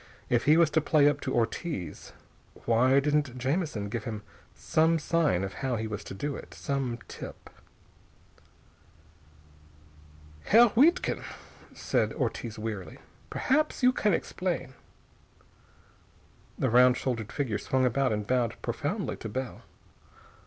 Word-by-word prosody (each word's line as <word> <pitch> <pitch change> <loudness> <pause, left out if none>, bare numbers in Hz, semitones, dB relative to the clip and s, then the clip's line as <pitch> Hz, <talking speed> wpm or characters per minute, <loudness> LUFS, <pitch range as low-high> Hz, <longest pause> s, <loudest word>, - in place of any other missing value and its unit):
If 120 -1 +2
he 150 +2 +6
was 165 -3 +4
to 160 - +3
play 150 -1 +4
up 145 -1 +1
to 130 - -3
Ortiz, 115 - -3 0.5
why 125 +4 +4
didn't 145 -3 0
Jamison 130 - -1
give 110 +1 -4
him 110 -3 -5 0.3
some 160 +1 +2
sign 155 - +1
of 95 - -4
how 130 -2 0
he 110 -1 -3
was 110 -2 -5
to - - -7
do 145 +7 -3
it? - - -10
Some 135 -4 -2
tip.... - - -10 2.9
"Herr 235 +3 +7
Wiedkind," 315 +9 +3 0.5
said - - 0
Ortiz 115 -2 -3
wearily, 105 -4 -5 0.3
"perhaps 300 0 0
you 250 - +7
can 210 -4 +1
explain." 175 -8 -3 1.8
The 130 - 0
round 125 +1 +6
shouldered 115 -5 -3
figure 120 -8 -2
swung 130 +3 +1
about 130 +1 +1
and 105 -1 -2
bowed 125 -1 0
profoundly - - -2
to 110 - -6
Bell. 130 +3 -5
130 Hz, 130 wpm, -28 LUFS, 115-155 Hz, 2.9 s, Herr